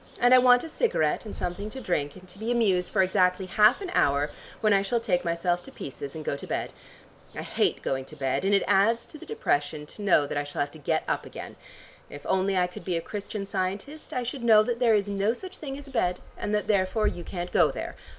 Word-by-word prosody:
And 245 Hz, +1 st, +5 dB
I 255 Hz, -, +9 dB
want 245 Hz, -1 st, +6 dB
a -, -, -5 dB
cigarette 230 Hz, -, 0 dB
and -, -, -8 dB
something 180 Hz, +4 st, -4 dB
to 265 Hz, -, -7 dB
drink, 145 Hz, -, -1 dB
and 185 Hz, 0 st, -14 dB
to 190 Hz, -, -13 dB
be 225 Hz, +2 st, -2 dB
amused 195 Hz, -7 st, +2 dB
for 195 Hz, -3 st, +3 dB
exactly 185 Hz, 0 st, +2 dB
half 215 Hz, -, +4 dB
an 375 Hz, -3 st, -5 dB
hour, 145 Hz, +1 st, +2 dB, 0.3 s
when 215 Hz, -2 st, +3 dB
I 195 Hz, -, +4 dB
shall 215 Hz, +4 st, 0 dB
take 180 Hz, -6 st, 0 dB
myself 175 Hz, +1 st, 0 dB
to -, -, -12 dB
pieces 140 Hz, +1 st, -7 dB
and 155 Hz, -1 st, -7 dB
go -, -, -1 dB
to -, -, -8 dB
bed. -, -, -3 dB, 0.6 s
I -, -, -4 dB
hate -, -, 0 dB
going 135 Hz, 0 st, -1 dB
to 155 Hz, -, -11 dB
bed 135 Hz, +1 st, -1 dB
and 195 Hz, -, +2 dB
it 195 Hz, -, +3 dB
adds 225 Hz, +4 st, +3 dB
to 305 Hz, -, -12 dB
the -, -, -12 dB
depression 150 Hz, -, -1 dB
to 210 Hz, -, -11 dB
know 185 Hz, -7 st, +4 dB
that 145 Hz, -, -2 dB
I -, -, -1 dB
shall 145 Hz, -, -4 dB
have 145 Hz, 0 st, -1 dB
to 160 Hz, -, -13 dB
get 140 Hz, -, 0 dB
up -, -, 0 dB
again. -, -, -9 dB, 0.5 s
If 145 Hz, -, -10 dB
only 190 Hz, 0 st, +1 dB
I 180 Hz, -, +4 dB
could 180 Hz, -1 st, -9 dB
be 175 Hz, -1 st, -1 dB
a -, -, 0 dB
Christian 205 Hz, +3 st, -5 dB
Scientist 200 Hz, +11 st, -4 dB
I 250 Hz, -, -1 dB
should 250 Hz, +1 st, -5 dB
know 220 Hz, -2 st, +7 dB
that 235 Hz, +1 st, -2 dB
there 235 Hz, -3 st, +4 dB
is 205 Hz, -1 st, +1 dB
no 200 Hz, +3 st, 0 dB
such 375 Hz, +6 st, -8 dB
thing 275 Hz, -3 st, -5 dB
as 285 Hz, -, -9 dB
a -, -, -11 dB
bed, 180 Hz, -7 st, 0 dB, 0.2 s
and -, -, -4 dB
that 210 Hz, -, 0 dB
therefore 200 Hz, +1 st, +1 dB
you 175 Hz, -, -1 dB
can't 175 Hz, 0 st, -5 dB
go 165 Hz, -4 st, +4 dB
there. -, -, -5 dB
195 Hz, 255 wpm, -27 LUFS, 175-230 Hz, 0.6 s, I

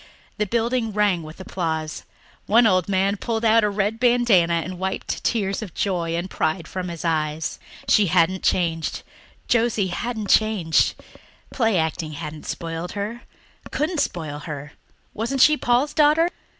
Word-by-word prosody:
The 210 Hz, -, +1 dB
building 235 Hz, 0 st, 0 dB
rang 205 Hz, -4 st, +2 dB
with 155 Hz, +2 st, -11 dB
applause; 160 Hz, -4 st, -3 dB, 0.4 s
one 230 Hz, +3 st, +5 dB
old 185 Hz, -3 st, +3 dB
man 195 Hz, +1 st, +1 dB
pulled 230 Hz, +1 st, -2 dB
out 225 Hz, 0 st, +5 dB
a 210 Hz, -, +3 dB
red 205 Hz, +2 st, -1 dB
bandanna 235 Hz, -9 st, +4 dB
and 185 Hz, 0 st, -7 dB
wiped 190 Hz, 0 st, -3 dB
tears 200 Hz, -4 st, 0 dB
of 195 Hz, -7 st, -8 dB
joy 170 Hz, -4 st, -1 dB
and 175 Hz, +2 st, -2 dB
pride 165 Hz, -1 st, -2 dB
from 185 Hz, -1 st, -4 dB
his 170 Hz, -1 st, -6 dB
eyes. 155 Hz, -1 st, -1 dB, 0.3 s
She 205 Hz, -2 st, +4 dB
hadn't 180 Hz, +2 st, +2 dB
changed 165 Hz, -3 st, 0 dB, 0.4 s
Josie 225 Hz, -5 st, +2 dB
hadn't 220 Hz, +3 st, -3 dB
changed. 210 Hz, -7 st, +3 dB, 0.6 s
Play 225 Hz, -6 st, +1 dB
acting 160 Hz, -1 st, -2 dB
hadn't 150 Hz, 0 st, -7 dB
spoiled 165 Hz, +1 st, -4 dB
her 210 Hz, +4 st, -4 dB, 0.5 s
couldn't 315 Hz, +2 st, -1 dB
spoil 155 Hz, -, -2 dB
her. 150 Hz, -2 st, -7 dB, 0.4 s
Wasn't 235 Hz, +5 st, -2 dB
she 305 Hz, -, +7 dB
Paul's 255 Hz, +2 st, +1 dB
daughter! 310 Hz, +3 st, +4 dB
190 Hz, 150 wpm, -23 LUFS, 165-225 Hz, 0.6 s, she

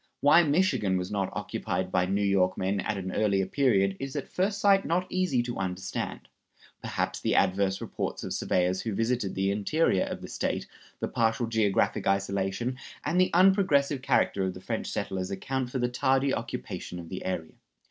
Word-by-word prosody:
Why 145 Hz, +4 st, +6 dB
Michigan 145 Hz, -, +2 dB
was 90 Hz, 0 st, -4 dB
not 100 Hz, -2 st, -1 dB
occupied 95 Hz, 0 st, -3 dB
by 90 Hz, -, +2 dB
New 100 Hz, +2 st, 0 dB
York 95 Hz, -2 st, +2 dB
men 95 Hz, +2 st, 0 dB
at 105 Hz, +2 st, -2 dB
an 95 Hz, -1 st, -4 dB
earlier 100 Hz, -1 st, +1 dB
period 100 Hz, -5 st, +2 dB
is 135 Hz, +1 st, -5 dB
at 145 Hz, -, -3 dB
first 200 Hz, +2 st, 0 dB
sight 195 Hz, -1 st, +4 dB
not 180 Hz, +2 st, 0 dB
easy 180 Hz, -10 st, +1 dB
to 120 Hz, -4 st, -5 dB
understand. 95 Hz, 0 st, -4 dB, 0.5 s
Perhaps -, -, -2 dB
the -, -, 0 dB
adverse 95 Hz, 0 st, +2 dB
reports -, -, -4 dB
of -, -, -4 dB
surveyors 90 Hz, +1 st, +1 dB
who 110 Hz, -4 st, -3 dB
visited 115 Hz, -3 st, 0 dB
the 95 Hz, +1 st, +1 dB
interior 105 Hz, -, +1 dB
of -, -, -5 dB
the -, -, -6 dB
State, -, -, -2 dB, 0.4 s
the -, -, 0 dB
partial 115 Hz, +1 st, +1 dB
geographical 110 Hz, -3 st, +1 dB
isolation, 100 Hz, +5 st, -2 dB, 0.3 s
and 170 Hz, +5 st, +2 dB
the 185 Hz, -, +3 dB
unprogressive 170 Hz, -7 st, +4 dB
character 100 Hz, -6 st, +2 dB
of 95 Hz, -1 st, -2 dB
the -, -, -8 dB
French -, -, -3 dB
settlers 95 Hz, -1 st, -3 dB
account 125 Hz, +6 st, -3 dB
for 130 Hz, -, -3 dB
the 125 Hz, -1 st, +1 dB
tardy 135 Hz, +2 st, +1 dB
occupation 90 Hz, -, -5 dB
of 85 Hz, -1 st, -8 dB
the 95 Hz, -, -5 dB
area. 85 Hz, -4 st, -3 dB
105 Hz, 180 wpm, -28 LUFS, 95-135 Hz, 0.5 s, Why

